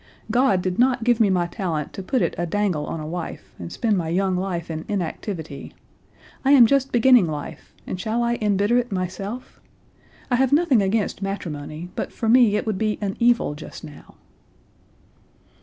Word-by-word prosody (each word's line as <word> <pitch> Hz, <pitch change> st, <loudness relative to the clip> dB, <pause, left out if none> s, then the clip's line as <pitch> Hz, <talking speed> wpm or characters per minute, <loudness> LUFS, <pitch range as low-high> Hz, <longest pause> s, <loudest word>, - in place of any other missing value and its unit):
God 240 Hz, -8 st, +3 dB
did 185 Hz, +1 st, -2 dB
not 250 Hz, -1 st, +3 dB
give 240 Hz, 0 st, +3 dB
me 215 Hz, -3 st, +4 dB
my 180 Hz, -2 st, +2 dB
talent 170 Hz, -5 st, -3 dB
to -, -, -6 dB
put 250 Hz, +6 st, 0 dB
it -, -, 0 dB
a 175 Hz, -, -2 dB
dangle 180 Hz, -5 st, -1 dB
on 165 Hz, -, -4 dB
a 155 Hz, -, -6 dB
wife, 170 Hz, +2 st, -6 dB
and 85 Hz, -1 st, -7 dB
spend 215 Hz, -4 st, 0 dB
my 165 Hz, -2 st, -3 dB
young 190 Hz, +2 st, +1 dB
life 180 Hz, -3 st, -3 dB
in 160 Hz, 0 st, -4 dB
inactivity. 170 Hz, -5 st, -5 dB, 0.7 s
I 275 Hz, +1 st, +5 dB
am 255 Hz, -4 st, +9 dB
just 270 Hz, +2 st, +2 dB
beginning 240 Hz, -5 st, +5 dB
life, 150 Hz, -2 st, -7 dB
and 185 Hz, -, -5 dB
shall 225 Hz, +4 st, -1 dB
I 235 Hz, 0 st, 0 dB
embitter 205 Hz, +3 st, +2 dB
it 245 Hz, -1 st, -4 dB
myself? 195 Hz, +6 st, -5 dB, 0.7 s
I 245 Hz, -, +4 dB
have 265 Hz, 0 st, +2 dB
nothing 290 Hz, -6 st, +4 dB
against 200 Hz, +1 st, -1 dB
matrimony, 170 Hz, -4 st, -5 dB
but -, -, -3 dB
for 225 Hz, -, -4 dB
me 230 Hz, -2 st, +5 dB
it -, -, -1 dB
would 215 Hz, -4 st, -2 dB
be 215 Hz, -1 st, 0 dB
an 200 Hz, -2 st, -3 dB
evil 235 Hz, -9 st, +3 dB
just 150 Hz, -, -10 dB
now." 150 Hz, -2 st, -12 dB
200 Hz, 185 wpm, -23 LUFS, 175-235 Hz, 0.7 s, am